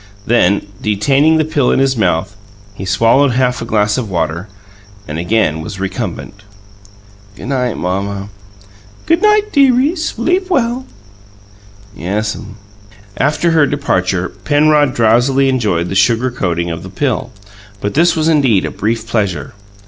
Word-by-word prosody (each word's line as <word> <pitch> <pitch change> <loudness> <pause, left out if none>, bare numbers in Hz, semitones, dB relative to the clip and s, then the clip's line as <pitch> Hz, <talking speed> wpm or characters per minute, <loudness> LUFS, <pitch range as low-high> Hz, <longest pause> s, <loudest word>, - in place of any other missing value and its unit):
Then, 100 -4 +2 0.2
detaining 135 +10 +2
the 155 - +1
pill 145 -4 +1
in - - +2
his 135 0 +2
mouth, 95 -2 0 0.4
he 95 - -7
swallowed 115 +8 +3
half 125 -1 0
a - - -4
glass 105 +1 +1
of 115 -5 -5
water, 85 +1 -2 0.6
and 75 +1 -4
again 85 -4 0
was 95 +4 -7
recumbent. 95 +1 -5 1.0
"G' - - -9
night, 125 -3 -1
Mamma." 100 +2 -3 0.8
"Good 330 +1 +2
night, 425 0 +3
dearie. 275 +2 +3
Sleep 355 - -1
well." 255 -5 0 1.1
"Yes'm." 105 +3 -4 0.6
After 150 +4 +1
her 155 -3 +4
departure 95 -10 -1
Penrod 145 +6 +2
drowsily 120 +4 +3
enjoyed 105 -10 0
the - - -4
sugar 115 +6 +2
coating 85 -6 -2
of 80 0 -5
the 95 - -9
pill; 130 +4 -2 0.5
but 100 - -3
this 170 +4 +3
was 160 -1 0
indeed 135 -11 +3
a - - -4
brief 110 +2 -2
pleasure. 100 -4 -2
115 Hz, 140 wpm, -15 LUFS, 95-145 Hz, 1.1 s, her